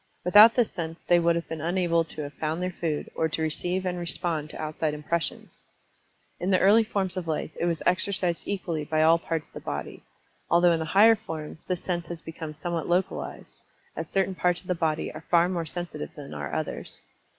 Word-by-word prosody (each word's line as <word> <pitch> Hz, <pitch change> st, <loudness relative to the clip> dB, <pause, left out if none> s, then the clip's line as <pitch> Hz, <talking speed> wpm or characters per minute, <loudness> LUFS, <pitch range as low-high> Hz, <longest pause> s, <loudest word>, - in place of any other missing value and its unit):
Without 210 Hz, +5 st, +8 dB
this 245 Hz, -3 st, +2 dB
sense 165 Hz, -2 st, -5 dB
they 175 Hz, -, +5 dB
would 170 Hz, 0 st, +3 dB
have 170 Hz, -, -3 dB
been 160 Hz, -2 st, -5 dB
unable 170 Hz, 0 st, +2 dB
to 155 Hz, -1 st, -7 dB
have 145 Hz, 0 st, -7 dB
found 155 Hz, +3 st, -2 dB
their 180 Hz, 0 st, -1 dB
food, 165 Hz, -4 st, -3 dB
or 160 Hz, -, 0 dB
to 160 Hz, -, -2 dB
receive 175 Hz, +4 st, -1 dB
and 180 Hz, -1 st, -2 dB
respond 170 Hz, -3 st, -2 dB
to -, -, -8 dB
outside 155 Hz, 0 st, -2 dB
impressions. 165 Hz, +3 st, -2 dB, 0.9 s
In 180 Hz, -, -1 dB
the 190 Hz, -, +5 dB
early 210 Hz, +4 st, +6 dB
forms 190 Hz, -4 st, -2 dB
of 175 Hz, -2 st, -3 dB
life 160 Hz, 0 st, -2 dB
it -, -, -1 dB
was 170 Hz, -2 st, -1 dB
exercised 180 Hz, -1 st, +1 dB
equally 175 Hz, -6 st, -2 dB
by 155 Hz, +1 st, +1 dB
all 165 Hz, +1 st, +6 dB
parts 165 Hz, -2 st, -3 dB
of -, -, -24 dB
the -, -, -6 dB
body, -, -, -5 dB, 0.5 s
although 175 Hz, +1 st, +5 dB
in 165 Hz, -, +2 dB
the 160 Hz, -, -2 dB
higher 225 Hz, +2 st, +8 dB
forms 160 Hz, -7 st, -7 dB
this 180 Hz, -1 st, -2 dB
sense 175 Hz, -2 st, -2 dB
has 170 Hz, 0 st, -6 dB
become 160 Hz, -1 st, -7 dB
somewhat 170 Hz, +1 st, -3 dB
localized, 185 Hz, +2 st, -2 dB, 0.3 s
as -, -, -5 dB
certain 195 Hz, 0 st, +1 dB
parts 180 Hz, -1 st, +1 dB
of -, -, -23 dB
the 180 Hz, -, +2 dB
body 160 Hz, -3 st, -1 dB
are 155 Hz, -, -8 dB
far 170 Hz, 0 st, +5 dB
more 170 Hz, -3 st, -2 dB
sensitive 175 Hz, -2 st, -5 dB
than 145 Hz, -2 st, -9 dB
are 75 Hz, -1 st, -5 dB
others. -, -, -4 dB
170 Hz, 210 wpm, -27 LUFS, 160-180 Hz, 0.9 s, Without